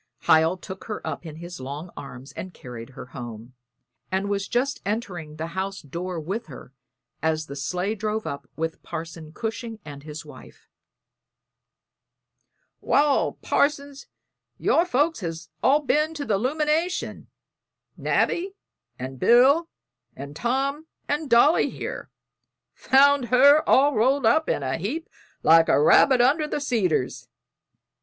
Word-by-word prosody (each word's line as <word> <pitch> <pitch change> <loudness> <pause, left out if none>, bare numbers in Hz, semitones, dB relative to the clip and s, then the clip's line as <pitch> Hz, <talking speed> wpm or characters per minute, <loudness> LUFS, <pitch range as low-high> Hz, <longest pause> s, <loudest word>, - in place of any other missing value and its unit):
Hiel 160 +3 +4
took 190 +1 -9
her 215 - -6
up 170 - -5
in 155 - -8
his 175 0 -9
long 145 +6 -7
arms 135 0 -9
and 185 +6 -8
carried 120 -2 -9
her - - -7
home, 120 -1 -8 0.6
and 190 +2 -1
was 200 -1 -1
just 265 +4 -1
entering 185 -8 -4
the 155 +1 -4
house 195 +1 -3
door 170 +5 -5
with 195 +9 -4
her 135 - -12 0.5
as 160 0 0
the 140 - -8
sleigh 180 +8 -2
drove 215 +1 -3
up 140 -1 -6
with 160 0 -4
Parson 160 -1 -7
Cushing 225 +3 -5
and 145 -2 -9
his 155 +2 -8
wife. - - -14 2.1
"Wal, 285 -1 +2
Parson, 285 -1 +1 0.6
your 335 - +2
folks 310 +2 +1
has 165 -3 -6
all 285 +4 +4
ben 305 +3 +1
to 290 -2 -4
the 200 -5 +1
'lumination 305 - -1 0.7
Nabby 380 +3 0 0.4
and 130 +1 -7
Bill 275 - +5 0.5
and 140 +1 -8
Tom 275 - -1 0.2
and 295 0 -2
Dolly 240 +8 +5
here; - - -6 0.6
found 280 0 +4
her 275 +5 +6
all 285 +2 +5
rolled 255 +4 +2
up 315 +8 +3
in 140 - 0
a 130 +2 -1
heap 280 - -3 0.4
like 165 0 +6
a - - +4
rabbit 250 - +5
under 295 +5 +3
the 300 - -2
cedars." 200 - -1
205 Hz, 135 wpm, -24 LUFS, -, 2.1 s, her